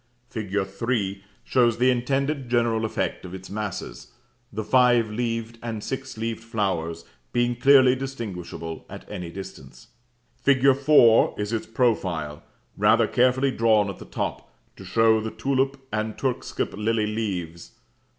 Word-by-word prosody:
Fig. 105 -4 -5
3 100 -1 -2 0.2
shows 120 -3 +2
the 125 +2 +4
intended 135 +2 -1
general 115 -2 +1
effect 110 - -2
of 90 0 -7
its 95 0 -10
masses, 105 -2 -5 0.4
the 110 +1 -4
five 120 -2 +4
leaved 115 0 -3
and 115 -3 -5
six 135 -2 -5
leaved 115 0 -3
flowers 95 -8 -2 0.3
being 120 0 +1
clearly 130 0 +6
distinguishable 100 -11 -6
at - - -9
any 90 -5 -5
distance. 65 -8 -10 0.5
Fig. 135 -1 +4
4 135 -5 +5
is 105 +2 -2
its 115 - -2
profile, 95 - 0 0.3
rather - - +4
carefully 130 +2 +2
drawn 110 -4 +3
at - - -12
the - - -10
top, - - -4 0.2
to - - -11
show 110 -1 +3
the 110 - -3
tulip 135 +4 -1
and 110 0 -2
turkscap 130 -3 -2
lily 110 +1 0
leaves. 95 -6 -4
115 Hz, 140 wpm, -25 LUFS, 100-125 Hz, 0.5 s, clearly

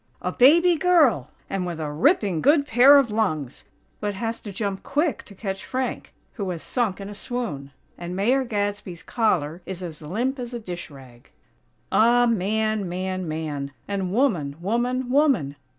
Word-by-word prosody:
_ - - -4
"A - - 0
baby 335 +7 +5
girl 305 - +3 0.2
and 195 -1 -2
with 175 -2 -4
a 150 -2 -3
ripping 190 - +2
good 290 0 +4
pair 265 +3 +7
of 265 -6 +2
lungs!" 155 - -2 0.3
but 205 -1 -2
has 225 +3 -3
to 205 - -7
jump 200 -2 -3
quick 300 +2 0
to 200 - -14
catch 195 -1 -5
Frank, 260 0 -3 0.2
who 200 -5 -4
has 170 -3 -5
sunk 230 -7 -1
in 195 - -6
a 205 - -7
swoon. 210 - -5 0.3
And 175 +1 -5
Mayor 245 +8 +2
Gadsby's 205 -6 -3
collar 175 -8 0
is 185 -1 -6
as 165 -3 -8
limp 235 - -2
as 245 0 -5
a - - -4
dish 180 -6 -7
rag! 130 -4 -15 0.6
Ah! 240 +2 +5
Man, 215 -2 0
man, 185 0 -3
man! 150 -3 -4
and 195 -2 -2
woman, 190 - +1
woman, 240 +7 -1
woman! 260 - +2
205 Hz, 170 wpm, -24 LUFS, 175-245 Hz, 0.6 s, pair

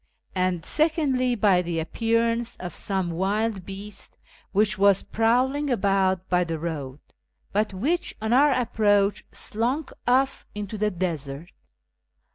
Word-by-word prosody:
iiiid 180 -2 0
secondly 285 -6 +1
by 200 -5 +4
the 170 -1 -3
appearance 230 +6 0
of 175 -3 -7
some 190 -3 -1
wild 195 +2 -1
l)east 200 +1 -7 0.3
which 210 +1 +2
was 200 -1 +4
prowling 255 +6 +1
about 190 -5 +1
by 180 0 +2
the 165 -2 -3
road, 150 -5 -5 0.5
but 210 +2 +1
wliieh, 285 - -1
on 220 +2 0
our 285 +3 +5
a])proach, 210 -5 +2
slunk 250 +8 -1
off 265 +2 +2
into 210 0 -5
the 210 0 +1
desert. 165 -4 -4
205 Hz, 125 wpm, -25 LUFS, 185-235 Hz, 0.5 s, our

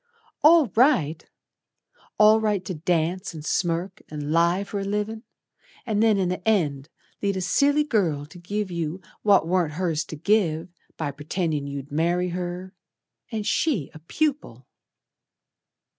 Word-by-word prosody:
"All 320 0 +7
right! 180 - +3 0.9
All 215 +1 +6
right 205 -4 0
to 190 - -3
dance, 170 +2 -1
and 155 -1 -8
smirk, 175 +2 -1
and 150 -1 -5
lie 170 +4 +3
For 200 0 -5
a - - -3
livin', 210 +2 -2 0.6
And 215 -3 0
then 220 -2 +4
in 185 -2 +1
the 185 +4 -4
end 150 -9 +1 0.3
Lead 200 -1 0
a - - -2
silly 285 +11 +3
girl 175 - 0
to 170 +4 -14
give 200 +2 -3
you 170 0 -3 0.2
What 200 -5 +4
warn't 175 -3 +1
hers 165 -3 0
to - - -7
give 170 -1 +1 0.3
By 150 -3 -2
pretendin' 150 0 -2
you'd 140 0 -6
marry 175 +4 +1
her 180 +1 -5 0.6
And 215 -2 -3
she 235 - 0
a 155 - -11
pupil." 210 - -2
180 Hz, 145 wpm, -24 LUFS, 160-210 Hz, 0.9 s, All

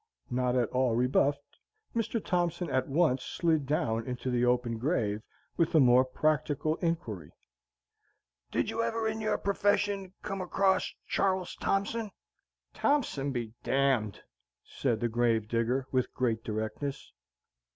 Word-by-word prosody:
Not 125 0 +1
at 120 -3 +2
all 125 -2 +1
rebuffed, 140 +3 +1 0.4
Mr. 230 0 0
Thompson 175 -2 0
at 130 -1 +1
once 140 -3 +2
slid 160 -5 0
down 115 -6 0
into 125 0 -3
the 120 0 +1
open 120 -2 +1
grave, 110 -7 0 0.4
with 165 -1 +1
a - - +8
more 125 -1 +6
practical 155 +3 0
inquiry, 115 - -3 1.2
"Did - - 0
you 230 - -1
ever, 230 -1 0
in 220 0 -2
your 215 - +1
profession, 200 -1 0
come 195 -1 -3
across 190 +1 +1 0.2
Char 190 -1 +2
les 185 - -7
Thompson?" 210 +3 -1 0.6
"Thompson 235 - +1
be 120 -4 -4
d - - -1
d!" 135 -6 +2 0.5
said 120 -5 -2
the 120 - +2
grave 115 -2 +1
digger, 120 +3 0
with 130 -1 +1
great 115 -3 0
directness. 110 +6 -4
135 Hz, 140 wpm, -30 LUFS, 120-180 Hz, 1.2 s, a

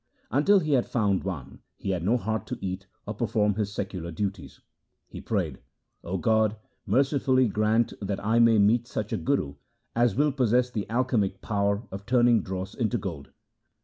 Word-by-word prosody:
Until 150 - +4
he 155 -2 -2
had 125 -3 +2
found 100 -5 +1
one, 90 -9 -6 0.2
he 100 - -3
had 90 -3 -2
no 110 +7 +3
heart 110 -2 -3
to - - -4
eat 95 0 -5 0.2
or - - -4
perform 105 -1 +1
his 105 0 -2
secular 95 -4 -4
duties. 95 +1 -4 0.5
He - - -9
prayed, - - -2 0.2
' - - -50
O 95 +3 -3
God, 110 +3 +2 0.3
mercifully 130 +2 +3
grant 110 +2 +1
that 100 -1 -2
I 115 +2 +3
may 115 -1 +6
meet 110 +4 +3
such 110 -3 -4
a - - +1
guru 75 - -1 0.4
as 120 -3 +3
will 145 +3 +3
possess 125 -1 +2
the 105 -3 -4
alchemic 115 -5 0
power 100 0 0
of 100 +2 -8
turning 120 -2 +4
dross 95 0 -5
into 120 -1 0
gold.' 85 -10 -6
110 Hz, 180 wpm, -27 LUFS, 95-120 Hz, 0.5 s, may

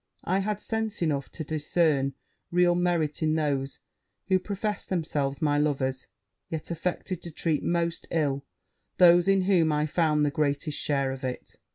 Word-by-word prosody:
I 185 +2 +1
have 205 +1 -1
sense 220 -4 -2
enough 140 -4 -1
to 160 - -6
discern 150 -2 +1 0.3
real 175 0 +4
merit 175 -4 0
in 155 0 +2
those 140 -3 -1 0.5
who 190 -1 +4
professed 205 +2 -3
themselves 155 -4 -1
my 145 -1 +3
lovers; 135 -3 -1 0.4
yet 160 +1 -5
affected 175 +1 -3
to 170 - -7
treat 160 -1 -1
most 170 -1 -1
ill 140 -4 0 0.5
those 175 0 +6
in 195 -1 +4
whom 175 -5 +3
I 150 0 +1
found 150 -1 +2
the 145 - +1
greatest 145 +1 -1
share 140 -2 0
of 135 0 -7
it. 130 -1 -5
155 Hz, 160 wpm, -27 LUFS, 145-175 Hz, 0.5 s, those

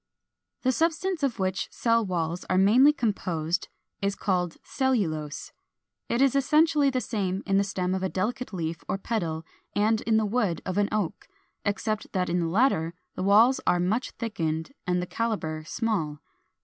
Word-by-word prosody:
] - - -53
402. - - -1
The 260 - +3
substance 335 +2 0
of 270 -5 0
which 190 -2 -1
cell 230 -1 +2
walls 175 -3 -2
are 185 - +2
mainly 235 +10 +6
composed 180 - -1 0.3
is 200 0 0
called 180 -4 -1
CELLULOSE. 165 - -1 0.6
It 240 +3 +3
is 275 -1 +3
essentially 300 +1 +4
the 255 -1 0
same 195 -5 -2
in 195 -1 +2
the 200 - +4
stem 185 -2 -2
of 190 - -1
a 190 - 0
delicate 220 +6 -2
leaf 165 -3 -4
or - - 0
petal 170 -7 -2 0.3
and 215 +1 +2
in 225 -1 +2
the 220 - +2
wood 210 -5 0
of 185 +2 -1
an 205 - +2
Oak, 210 -6 -2 0.4
except 215 +1 -2
that 185 -2 0
in 175 +1 +1
the 170 - 0
latter 170 -4 +2 0.2
the - - -5
walls 215 +7 +5
are 175 - +4
much 205 +8 0
thickened 165 -8 -3 0.2
and 180 0 +1
the - - -3
calibre 180 -8 -2
small. 185 -11 -1
200 Hz, 175 wpm, -27 LUFS, 180-235 Hz, 0.6 s, mainly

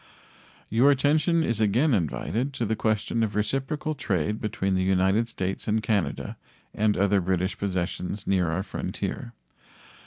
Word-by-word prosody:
Your 120 +6 +5
attention 150 +4 +3
is 115 -6 0
again 120 +8 +3
invited 105 - -1
to 120 - -2
the 110 +1 0
question 110 +1 0
of 110 -2 -1
reciprocal 135 +8 -1
trade 105 - -1
between 95 -3 -1
the 95 - +1
United 95 +4 +2
States 95 -4 -4
and 110 0 +1
Canada 100 -11 -1 0.4
and 105 0 +1
other 100 0 +3
British 95 +1 0
possessions 95 0 -3
near 90 -4 +2
our 90 +4 -1
frontier. 95 -10 -4
105 Hz, 145 wpm, -26 LUFS, 95-115 Hz, 0.4 s, Your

